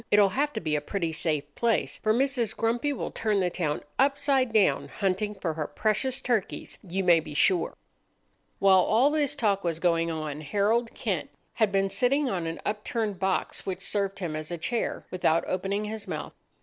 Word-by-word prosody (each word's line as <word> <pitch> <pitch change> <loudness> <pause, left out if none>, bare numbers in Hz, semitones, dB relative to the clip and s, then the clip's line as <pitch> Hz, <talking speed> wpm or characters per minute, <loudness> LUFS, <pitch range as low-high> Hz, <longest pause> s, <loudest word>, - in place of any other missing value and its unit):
"It'll 205 -1 +5
have 285 +9 0
to - - -2
be 155 -2 -1
a 150 - 0
pretty 170 +1 -2
safe 150 -2 0
place, 230 -2 0
for 215 - +1
Mrs. 250 -2 +1
Grumpy 235 +5 +1
will 275 - -4
turn 215 -2 0
the 180 -2 +1
town 155 -5 -2 0.2
upside 275 -2 +2
down 215 -3 +3
hunting 205 +1 -1
for 180 -4 -2
her 155 -1 -3
precious 250 +5 0
turkeys, 240 -7 -2
you 190 0 -3
may 175 -2 +6
be 150 -2 -8
sure." 175 +2 +2 0.8
While 190 -1 +6
all 230 +10 +4
this 295 -2 +1
talk 205 -7 +1
was 170 -2 -1
going 165 -1 +2
on, 155 -2 -4
Harold 210 +9 0
Kent - - -2 0.2
had 220 -4 +2
been 195 0 +1
sitting 260 +8 +2
on 175 -3 -2
an 165 - -4
upturned 210 -1 -2
box 190 +1 -1
which 185 -1 -3
served 200 -1 -1
him 170 -5 -3
as 155 0 -5
a 175 - -3
chair, 230 +8 -2
without 170 -2 +2
opening 195 +3 -1
his 215 0 -6
mouth. - - -5
200 Hz, 190 wpm, -27 LUFS, 170-230 Hz, 0.8 s, may